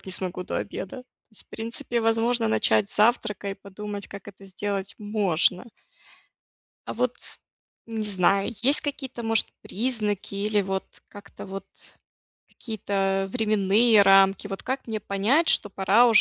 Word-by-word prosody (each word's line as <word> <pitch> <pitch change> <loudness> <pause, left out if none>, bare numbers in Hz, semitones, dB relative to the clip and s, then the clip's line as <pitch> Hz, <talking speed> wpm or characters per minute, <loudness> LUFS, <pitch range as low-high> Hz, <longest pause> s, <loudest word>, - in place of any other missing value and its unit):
функционировать - - -21
не - - -5
смогу 180 -1 0
до - - -4
обеда. 250 +7 -6 0.3
В 215 - -10
принципе, 235 +2 -3
возможно, 225 - +2
начать 110 -1 +2
с - - -8
завтрака 210 -2 +1
и 195 - -4
подумать, 205 +1 -8
как 200 0 -10
это 195 0 -13
сделать 195 0 -4
можно. 200 -4 +1 1.2
А - - -3
вот, 245 +1 -1 0.7
не 225 -1 -4
знаю, 195 +1 +2
есть 275 +4 +4
какие-то, 265 -5 -5
может, 225 -1 +3
признаки 210 -4 -2
или, 205 +1 +1
вот, 190 0 -3 0.2
как-то 205 - -12
вот 195 0 -7 0.8
какие-то 195 -3 -2
временные 215 0 +4
рамки, 195 0 +5
вот 195 -1 -6
как 260 0 -4
мне 220 -1 -3
понять, 220 +14 +1
что 205 - +3
пора 195 +5 +4
уже, 225 -2 +6
205 Hz, 145 wpm, -25 LUFS, 195-225 Hz, 1.2 s, уже